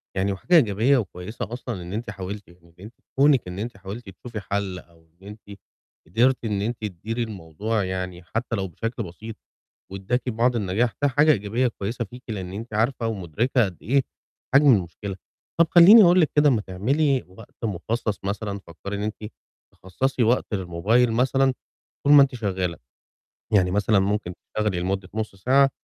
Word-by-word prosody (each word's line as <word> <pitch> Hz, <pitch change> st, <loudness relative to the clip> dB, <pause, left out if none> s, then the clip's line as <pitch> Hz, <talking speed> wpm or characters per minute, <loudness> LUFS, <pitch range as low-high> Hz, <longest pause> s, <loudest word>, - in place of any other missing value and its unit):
يعني 95 Hz, +1 st, 0 dB
وحاجة 175 Hz, -, +1 dB
إيجابية 120 Hz, -, +4 dB
وكويسة 105 Hz, +1 st, -5 dB
أصلًا 120 Hz, -6 st, -5 dB
إن 85 Hz, +2 st, -8 dB
أنتِ 110 Hz, 0 st, -4 dB
حاولتِ، 100 Hz, +1 st, -7 dB
يعني 85 Hz, +1 st, -19 dB, 0.2 s
إن -, -, -12 dB
أنتِ 110 Hz, -, -11 dB, 0.3 s
كونِك 140 Hz, -6 st, +4 dB
إن 90 Hz, +2 st, -6 dB
أنتِ 115 Hz, -1 st, -5 dB
حاولت 100 Hz, +2 st, -8 dB
تشوفي 110 Hz, +4 st, -8 dB
حَلّ 100 Hz, -1 st, -3 dB
أو 85 Hz, -2 st, -22 dB
إن 95 Hz, +4 st, -17 dB
أنتِ 105 Hz, -1 st, -12 dB, 0.5 s
قدرت 120 Hz, +7 st, +2 dB
إن 105 Hz, -2 st, -1 dB
أنتِ 115 Hz, +3 st, -2 dB
تديري 110 Hz, +5 st, -4 dB
الموضوع 105 Hz, +2 st, -3 dB
يعني 90 Hz, -1 st, -4 dB
حتى 115 Hz, +6 st, -3 dB
لو 95 Hz, -2 st, -2 dB
بشكل 115 Hz, -, -4 dB
بسيط 105 Hz, +6 st, -9 dB, 0.6 s
وادّاكِ 120 Hz, +7 st, -2 dB
بعض 120 Hz, +1 st, +1 dB
النجاح، 105 Hz, +3 st, 0 dB
ده 145 Hz, -, +4 dB
حاجة 145 Hz, +3 st, +4 dB
إيجابية 115 Hz, +2 st, 0 dB
كويسة 115 Hz, +2 st, -4 dB
فيكِ 125 Hz, +4 st, -12 dB
لأن 95 Hz, -4 st, -5 dB
أنتِ 110 Hz, +2 st, -7 dB
عارفة 115 Hz, +1 st, 0 dB
ومُدركة 110 Hz, -, 0 dB
قد 95 Hz, -4 st, -5 dB
إيه 135 Hz, +4 st, +2 dB, 0.5 s
حجم 145 Hz, +2 st, +6 dB
المشكلة، 95 Hz, +2 st, -5 dB, 0.4 s
طَب 170 Hz, -, +7 dB
خليني 200 Hz, +6 st, +9 dB
أقول 180 Hz, 0 st, +6 dB
لِك 155 Hz, -, +3 dB
كده 150 Hz, 0 st, +6 dB
ما 120 Hz, -5 st, +2 dB
تعملي 130 Hz, +9 st, 0 dB
وقت 95 Hz, +5 st, -14 dB
مخصَّص 110 Hz, +2 st, -2 dB
مثلًا، 100 Hz, 0 st, -3 dB
فكّري 100 Hz, +5 st, -7 dB
إن 100 Hz, -, -4 dB
أنتِ 105 Hz, 0 st, -5 dB, 0.4 s
تخصَّصي 125 Hz, +8 st, -2 dB
وقت 115 Hz, -1 st, +1 dB
للموبايل 100 Hz, +6 st, +1 dB
مثلًا 130 Hz, +2 st, +2 dB, 0.5 s
طول 145 Hz, -, +6 dB
ما 145 Hz, -, +10 dB
أنتِ 135 Hz, -1 st, 0 dB
شغالة، 95 Hz, -6 st, -2 dB, 0.8 s
يعني 90 Hz, -3 st, +4 dB
مثلًا 105 Hz, +2 st, +2 dB
ممكن 95 Hz, -2 st, -1 dB
تشتغلي 105 Hz, -5 st, -3 dB
لمدة 95 Hz, +1 st, -2 dB
نُصّ 110 Hz, -2 st, -3 dB
ساعة، 135 Hz, +7 st, +3 dB
105 Hz, 170 wpm, -24 LUFS, 95-120 Hz, 0.8 s, ما